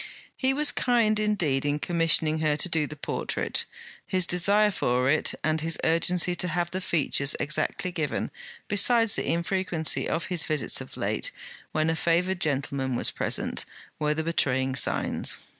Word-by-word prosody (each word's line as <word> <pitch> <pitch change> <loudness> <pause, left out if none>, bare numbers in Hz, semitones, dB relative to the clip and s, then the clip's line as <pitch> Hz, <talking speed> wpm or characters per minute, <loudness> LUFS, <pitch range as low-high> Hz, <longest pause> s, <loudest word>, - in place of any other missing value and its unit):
He 260 0 +1
was 295 +2 +3
kind 230 -4 +2
indeed 180 -11 0
in 145 0 0
commissioning 160 -1 +2
her 155 -1 +1
to 180 - +1
do 160 -3 0
the 150 - -8
portrait. 145 - -2 0.4
His 185 -2 +2
desire 200 +5 +3
for 125 -6 +1
it, 155 - +2
and 155 0 +1
his 165 0 -1
urgency 175 +2 +3
to 180 - +1
have 175 0 -2
the 185 - -3
features 145 -4 0
exactly 155 +4 -2
given, 160 -5 -3 0.4
besides 225 +2 +4
the - - -1
infrequency 170 -2 -1
of 165 - -2
his 175 -4 -1
visits 155 -1 0
of - - -11
late, - - -2 0.4
when 155 0 0
a 160 - +1
favoured 175 +3 0
gentleman 135 -3 -1
was - - +1
present, - - 0 0.4
were 150 0 0
the 160 - -2
betraying 130 -5 0
signs. - - +1
165 Hz, 160 wpm, -26 LUFS, 150-185 Hz, 0.4 s, besides